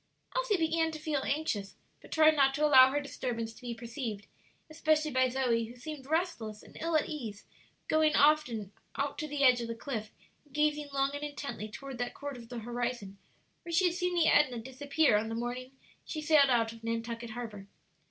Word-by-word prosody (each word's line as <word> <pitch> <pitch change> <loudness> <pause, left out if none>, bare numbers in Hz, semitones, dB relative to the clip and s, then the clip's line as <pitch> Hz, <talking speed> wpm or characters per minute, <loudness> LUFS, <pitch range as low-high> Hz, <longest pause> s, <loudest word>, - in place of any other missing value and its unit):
Elsie - - +2
began 325 0 +1
to 315 - -6
feel 305 -3 -1
anxious, 250 -10 -2 0.3
but - - -16
tried 310 0 +5
not 270 -2 +4
to 300 +1 +2
allow 260 -3 +8
her 285 +2 0
disturbance 235 -5 -4
to 225 - -16
be 240 -2 -5
perceived, 230 -3 -5 0.4
especially 310 -1 +1
by 260 0 +3
Zoe, 245 -3 +1
who 235 +2 -11
seemed 275 +1 -8
restless 315 - -2
and - - -16
ill 330 0 0
at - - 0
ease, 225 -10 -6 0.4
going 315 0 +3
often 280 -9 +3 0.2
out 280 +1 -2
to 310 - -3
the 290 -1 -1
edge 250 -2 +6
of 235 - -4
the 230 - -4
cliff 225 -3 -5 0.3
and 290 -2 -19
gazing 300 -1 +1
long 275 0 +1
and 285 - -4
intently 280 -7 -5
toward 265 +3 -8
that 245 - -3
quarter 285 -3 -6
of 230 -1 -13
the 245 - -6
horizon 235 -4 -4 0.4
where 340 - -8
she 335 +3 +3
had 350 - +3
seen 360 0 -1
the 335 -2 +4
Edna 265 -5 +4
disappear 265 +1 +1
on 220 +1 -2
the 225 - -3
morning 245 +2 -4 0.3
she 310 - -5
sailed 305 -2 +5
out 230 -2 +2
of 225 0 -15
Nantucket 230 +1 -3
harbor. 220 -4 -7
270 Hz, 200 wpm, -31 LUFS, 230-305 Hz, 0.4 s, allow